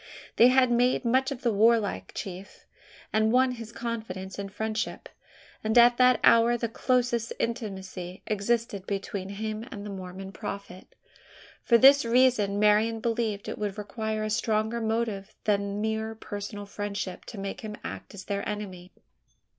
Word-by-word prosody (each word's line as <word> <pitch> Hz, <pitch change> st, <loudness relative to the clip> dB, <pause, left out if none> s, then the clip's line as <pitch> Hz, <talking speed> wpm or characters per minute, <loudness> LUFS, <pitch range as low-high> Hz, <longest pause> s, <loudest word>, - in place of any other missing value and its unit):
They 235 Hz, -, +8 dB
had 255 Hz, -1 st, +4 dB
made 245 Hz, +1 st, +2 dB
much 260 Hz, +3 st, +2 dB
of 265 Hz, -2 st, -6 dB
the 235 Hz, -3 st, +2 dB
warlike 220 Hz, 0 st, +2 dB
chief 190 Hz, 0 st, -7 dB, 0.5 s
had 220 Hz, 0 st, +3 dB
won 255 Hz, +1 st, +4 dB
his 230 Hz, -2 st, -7 dB
confidence 220 Hz, -5 st, -5 dB
and 200 Hz, -1 st, -5 dB
friendship 220 Hz, +1 st, -3 dB, 0.6 s
and 220 Hz, +2 st, +1 dB
at 240 Hz, 0 st, +7 dB
that 250 Hz, -2 st, +5 dB
hour 230 Hz, +1 st, +6 dB
the 235 Hz, -, -1 dB
closest 240 Hz, -1 st, 0 dB
intimacy 190 Hz, -5 st, -4 dB
existed 210 Hz, -1 st, -1 dB
between 195 Hz, -1 st, -4 dB
him 215 Hz, +2 st, -4 dB
and 205 Hz, -1 st, -7 dB
the 205 Hz, -, -6 dB
Mormon 190 Hz, 0 st, -7 dB
prophet. 195 Hz, -1 st, -8 dB, 0.7 s
For 235 Hz, -, +5 dB
this 275 Hz, +3 st, +7 dB
reason, 230 Hz, -4 st, +3 dB
Marian 210 Hz, +2 st, +3 dB
believed 225 Hz, -3 st, -1 dB
it -, -, -5 dB
would 205 Hz, -1 st, -3 dB
require 215 Hz, +1 st, -3 dB
a 215 Hz, -, -2 dB
stronger 220 Hz, +2 st, 0 dB
motive 220 Hz, -3 st, -2 dB
than 200 Hz, 0 st, 0 dB
mere 220 Hz, 0 st, -2 dB
personal 205 Hz, -1 st, -6 dB
friendship 200 Hz, -2 st, -5 dB
to 225 Hz, -, -9 dB
make 195 Hz, 0 st, -5 dB
him 215 Hz, -1 st, -6 dB
act -, -, -7 dB
as 190 Hz, -1 st, -9 dB
their 200 Hz, -1 st, -2 dB
enemy. 185 Hz, -4 st, -6 dB
215 Hz, 155 wpm, -27 LUFS, 200-235 Hz, 0.7 s, They